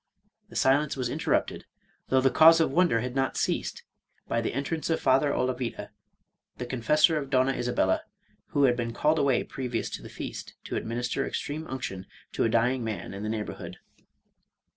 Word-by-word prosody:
The - - -14
silence 140 +2 +2
was 125 -2 -1
interrupted, - - -1 0.4
though, 130 0 +3
the 135 0 +3
cause 165 +5 +7
of 160 - +2
wonder 160 -7 +3
had 125 +1 -4
not 135 -1 0
ceased, - - -1 0.4
by 115 - 0
the 115 - -2
entrance 145 +6 -3
of 165 - +1
Father 135 +2 +3
Olavida, 125 -2 -2 0.7
the 125 - -4
Confessor 150 +6 +3
of 140 -2 -6
Donna 130 0 +3
Isabella, 120 -1 +1 0.5
who 145 - +1
had 125 -3 +4
T)een 115 -1 -3
called 155 +4 +2
away 135 -3 +2
previous 125 -3 -4
to - - -5
the - - -10
feast, - - -7
to - - -5
administer 120 +4 -2
ex - - -2
treme 155 +2 -5
unction 95 -8 -5 0.2
to - - 0
a 115 - +2
dying 120 +3 +2
man 110 -3 -4
in 100 - -6
the 105 - -3
neighborhood. 110 -1 -5
130 Hz, 180 wpm, -27 LUFS, 120-145 Hz, 0.7 s, cause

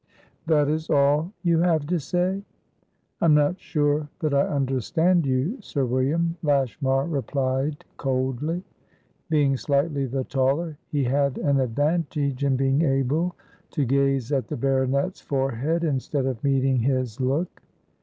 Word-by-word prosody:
"That 150 -3 +3
is 155 +2 -2
all 145 +5 +3
you 170 -2 +3
have 165 -4 +2
to 175 +3 0
say?" 180 +6 -1 0.8
"I - - +3
am 155 -2 +6
not 150 +5 +2
sure 150 -1 0
that 155 -3 -1
I 140 - +3
understand 145 +5 +1
you, 135 - 0
Sir 140 -8 -2
William," 145 +7 0
Lashmar 135 -2 +1
replied 140 -1 -2
coldly. 135 +6 -1 0.7
Being 145 -4 +2
slightly 140 +3 0
the 130 +1 -2
taller, 140 +5 -1
he 145 -2 0
had 140 +1 +1
an 140 -1 +1
advantage 145 +1 0
in 140 -1 +2
being 135 +2 +2
able 150 +4 +1 0.3
to 145 -4 -1
gaze 135 -1 +1
at 135 -3 0
the - - -4
baronet's 135 +6 0
forehead 135 +4 -1
instead 140 -2 -1
of 130 -4 -3
meeting 135 -2 +2
his 130 -2 -1
look. 140 +7 -1
140 Hz, 140 wpm, -24 LUFS, 135-155 Hz, 0.8 s, am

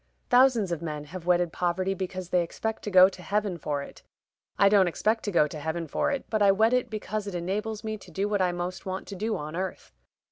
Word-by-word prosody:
Thousands 245 -6 +5
of 170 -2 -2
men 150 -3 -4
have 170 +3 -9
wedded 175 -2 +2
poverty 185 +2 0
because 185 -1 -5
they 180 -1 +3
expect 220 +6 -4
to - - -2
go 185 -1 +8
to 190 -1 -9
heaven 200 -2 -1
for 145 -1 -2
it; - - -12 0.6
I 200 - +6
don't 200 -2 +5
expect 215 +6 0
to 205 - -1
go 160 -4 +4
to 150 - -7
heaven 160 +2 -3
for - - 0
it, 280 -3 -2
but 215 -1 -1
I 200 -1 +6
wed 220 +4 +3
it 250 -1 +1
because 215 -1 -4
it 195 - -5
enables 210 +5 -3
me 215 -1 -4
to 190 - -14
do 195 +5 -1
what 205 -2 0
I 180 -1 +2
most 175 +1 -4
want 190 0 -4
to 200 - -6
do 215 +3 -2
on 150 +2 -6
earth. 185 +1 -5
185 Hz, 245 wpm, -27 LUFS, 175-210 Hz, 0.6 s, go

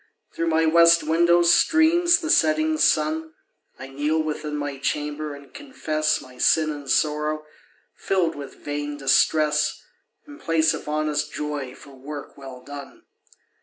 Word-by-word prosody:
Through 165 - -2
my 160 0 +2
west 170 +1 +5
window 170 +2 +3
streams 330 - +4
the 320 -1 -1
setting 315 -1 +2
sun. 160 - +1 0.4
I 130 - -9
kneel 145 +4 -1
within 150 -1 -4
my 145 -2 -5
chamber, 150 +1 -3
and 140 0 -16
confess 155 - -2
My 125 -1 -15
sin 155 -1 +3
and 145 -2 -8
sorrow, 150 +2 0 0.5
filled 180 -4 -1
with 140 -2 -9
vain 145 0 -4
distress, 150 +2 +2 0.5
In 290 +1 -13
place 165 - +1
of - - -8
honest 150 0 -2
joy 145 -4 -5
for 140 - -15
work 140 +2 -9
well 130 -2 -11
done. 145 -1 -11
155 Hz, 140 wpm, -23 LUFS, 145-165 Hz, 0.5 s, west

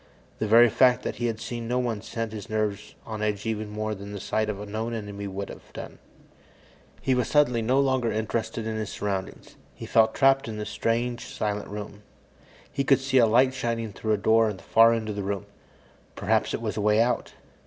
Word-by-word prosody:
The 110 - 0
very 115 +3 +7
fact 125 +1 +4
that - - -4
he 120 - 0
had 110 -1 -3
seen 120 -1 -5
no 125 +1 0
one 120 -4 -1
set 115 0 -4
his 105 -3 -8
nerves 105 -2 -2
on 110 -1 -5
edge 105 -1 -1
even 110 -1 -2
more 110 +1 -3
than 100 0 -8
the 100 - -5
sight 110 +3 -1
of 100 -2 -3
a 105 - -6
known 110 +3 -3
enemy 100 -2 -5
would 100 +1 -5
have - - -12
done. - - -8 1.0
He 135 - +2
was 125 -2 +1
suddenly 125 -6 +3
no 125 +4 +2
longer 130 -4 +2
interested 110 +1 -2
in 110 0 -2
his 110 -2 -3
surroundings. 95 -2 -5 0.2
He - - -8
felt 110 -1 +3
trapped 135 -1 +4
in 110 -1 -5
this 105 - -5
strange, 120 +1 -1
silent 105 -1 -3
room. 105 0 -7 0.7
He 140 - -1
could 135 0 +4
see 135 0 +2
a 115 - +6
light 130 +4 +4
shining 115 -4 -2
through 110 +2 -1
a - - +2
door 110 +2 +4
at 105 - -5
the - - -15
far 115 +1 +6
end 115 -1 -1
of 105 - -3
the 100 - -3
room 100 -1 -3 0.7
perhaps - - +1
it - - -6
was - - -3
a - - 0
way 105 +1 +3
out. 120 +2 +1
110 Hz, 220 wpm, -26 LUFS, 105-120 Hz, 1.0 s, very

